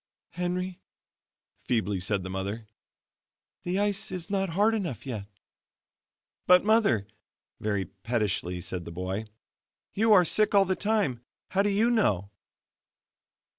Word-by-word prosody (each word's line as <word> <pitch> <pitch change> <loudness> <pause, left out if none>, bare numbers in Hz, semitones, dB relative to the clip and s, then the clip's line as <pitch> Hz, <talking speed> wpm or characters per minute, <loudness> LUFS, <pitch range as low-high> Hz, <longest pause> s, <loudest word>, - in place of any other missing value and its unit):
"Henry," 180 +1 -3 0.8
feebly 105 -5 0
said 95 +1 -1
the 95 - -6
mother, 100 +4 -4 1.0
"the 180 +2 -2
ice 205 -1 0
is 185 +1 -5
not 195 -1 0
hard 205 +7 +3
enough 175 - -3
yet." 110 -7 -5 1.2
"But, 180 +1 +6
Mother," 215 - +3 0.5
very 100 -3 -1
pettishly 95 -2 -2
said 90 -1 -4
the - - -7
boy, 95 +5 -3 0.7
"you 220 +2 +2
are 185 -4 +7
sick 210 +5 +3
all 200 -1 +6
the 190 0 0
time 205 - 0 0.3
how 195 +1 +2
do 205 - +2
you 215 +4 +2
know?" 100 - +1
165 Hz, 130 wpm, -28 LUFS, -, 1.2 s, are